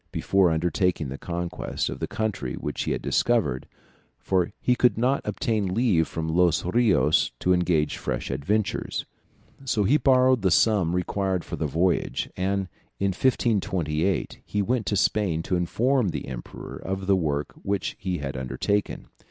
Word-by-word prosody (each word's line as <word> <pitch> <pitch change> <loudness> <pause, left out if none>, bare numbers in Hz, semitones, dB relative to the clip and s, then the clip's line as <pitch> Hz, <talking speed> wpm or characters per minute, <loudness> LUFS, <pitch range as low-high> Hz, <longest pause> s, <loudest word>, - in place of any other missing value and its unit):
before 95 -2 +2
undertaking 85 -1 0
the 70 - -6
conquest 85 0 -3
of - - -5
the - - -2
country 105 - -3
which - - -4
he - - -1
had - - -2
discovered, 65 +1 +1 0.5
for 90 -2 0
he 125 - +2
could 125 -2 +3
not 130 +4 +2
obtain 105 -8 -1
leave 105 -9 +3
from 80 -1 -4
Los 85 0 +2
Rios 90 - +3
to 90 - +2
engage 85 -4 +1
fresh 60 -1 -3
adventurers; 105 +8 -1 0.6
so 115 -5 +1
he 135 +10 +4
borrowed 130 -3 +4
the 95 - +3
sum 90 -2 +3
required 95 0 -1
for - - -5
the 80 - -2
voyage, 85 +5 0
and 95 +1 -1 0.3
in 100 - +1
1528 95 -7 0
he 105 - -2
went 120 +2 -1
to 105 - +1
Spain 95 -4 +1
to 90 - -1
inform 115 +6 +1
the - - -5
emperor 65 -2 -8
of 95 0 -4
the 100 0 +4
work 75 -5 -1
which 100 0 -2
he 95 -4 -2
had 70 -2 -5
undertaken. 95 +10 -2
95 Hz, 160 wpm, -25 LUFS, 80-105 Hz, 0.6 s, he